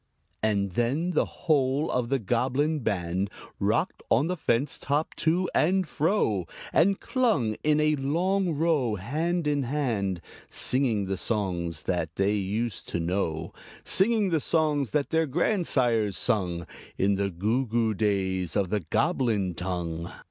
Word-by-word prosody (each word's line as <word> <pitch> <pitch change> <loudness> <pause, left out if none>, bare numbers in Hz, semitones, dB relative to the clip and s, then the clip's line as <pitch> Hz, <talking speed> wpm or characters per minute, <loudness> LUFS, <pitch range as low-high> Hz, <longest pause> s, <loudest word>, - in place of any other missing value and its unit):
And 100 -3 +1
then 130 - 0
the - - +1 0.2
whole 145 -1 +2
of 125 -2 -1
the 135 - +2
Goblin 130 +7 0
band 95 -4 -1 0.3
Rocked - - 0
on 125 +6 +4
the 180 +2 -1
fence 135 -4 0
top 145 +3 -1
to 175 +3 +1
and 185 +2 +2
fro, 150 - 0 0.3
And 195 +4 +3
clung, 215 - +1
in 150 0 +3
a 155 0 +3
long 175 +5 0
row, 145 -8 +1
hand 155 - -1
in 145 -1 +1
hand, 120 -9 -1 0.3
Singing 120 -6 +1
the 95 0 -2
songs 90 -8 -2
that 85 -3 -2
they 100 +1 +2
used 105 +2 -2
to - - -2
know 85 -2 -2 0.3
Singing 210 0 +3
the 165 -2 +2
songs 150 -4 +1
that 150 -2 -1
their 160 -1 +2
grandsires 130 - +1
sung 90 -5 0 0.3
In 100 +1 +2
the 100 0 0
goo 110 +9 0
goo 115 -1 +1
days 95 -4 0
of 95 -3 +1
the 105 - +1
Goblin 105 - 0
tongue. 85 -2 -4
120 Hz, 145 wpm, -27 LUFS, 95-155 Hz, 0.3 s, on